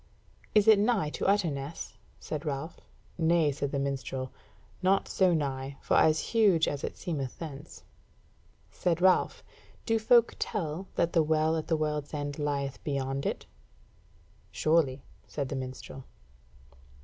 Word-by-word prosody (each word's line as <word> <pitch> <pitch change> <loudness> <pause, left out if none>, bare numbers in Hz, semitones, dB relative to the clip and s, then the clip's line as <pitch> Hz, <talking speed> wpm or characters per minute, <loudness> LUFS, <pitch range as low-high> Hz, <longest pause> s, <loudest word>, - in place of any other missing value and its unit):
"Is 210 -1 +5
it 215 -2 +8
nigh 205 -8 +1
to - - -2
Utterness?" 165 -7 -1 0.3
said 155 -1 -5
Ralph. 150 +1 -4 0.4
"Nay," 165 -2 +3
said 140 0 -3
the - - -1
minstrel, 135 -1 -3 0.5
"not 195 +1 +2
so 185 -2 +3
nigh; 135 -3 -2
for - - 0
as 155 0 +5
huge 200 -8 +4
as 145 -1 -3
it - - -4
seemeth 140 -7 -4
thence." 150 -2 -9 0.9
Said 170 -2 0
Ralph: 185 +1 +3 0.4
"Do 225 -1 +2
folk 235 +1 +4
tell 180 -3 -3
that 170 - +1
the 165 - +5
Well 155 +1 +2
at 160 - -3
the 160 - +1
World's 150 -1 -2
End 145 0 -4
lieth 140 -2 -2
beyond 135 -1 -2
it?" - - -3 1.1
"Surely," 155 -4 +1 0.2
said 140 -3 -4
the - - -3
minstrel. 130 0 -7
155 Hz, 140 wpm, -29 LUFS, 140-175 Hz, 1.1 s, it